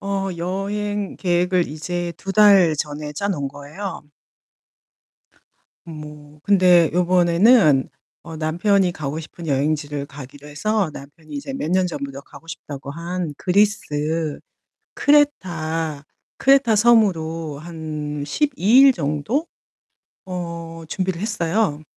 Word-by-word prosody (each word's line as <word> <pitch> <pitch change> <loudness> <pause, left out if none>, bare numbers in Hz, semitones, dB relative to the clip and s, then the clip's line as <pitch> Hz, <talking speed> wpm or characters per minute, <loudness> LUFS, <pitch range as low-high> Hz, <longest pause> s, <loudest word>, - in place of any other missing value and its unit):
어 195 -1 -2
여행 200 +3 -3
계획을 180 0 +1
이제 175 +3 -4
2 195 +2 -5
달 195 -6 +6
전에 150 0 -4
짜 200 +7 -3
놓은 145 -8 -2
거예요. 145 +8 -7 1.8
뭐 150 -2 -11
근데 180 -5 +5
요번에는 175 - +4 0.3
어 165 -1 -9
남편이 175 +4 +1
가고 150 0 -4
싶은 165 +1 -10
여행지를 145 0 -1
가기로 145 +1 -11
해서 195 +5 -1
남편이 145 +3 -13
이제 280 -1 -5
몇 270 - -3
년 185 0 +2
전부터 140 -5 -6
가고 140 +3 -16
싶다고 145 -4 -8
한 170 0 -4
그리스 205 +3 +2 1.2
크레타 165 - +1 0.3
크레타섬으로 210 - +3
한 155 -3 -5
12 285 - -1 0.2
일 275 -1 +8
정도 155 - -2 0.8
어 170 -2 -6
준비를 185 0 -2
했어요. 200 -5 -1
170 Hz, 220 characters per minute, -21 LUFS, 150-195 Hz, 1.8 s, 일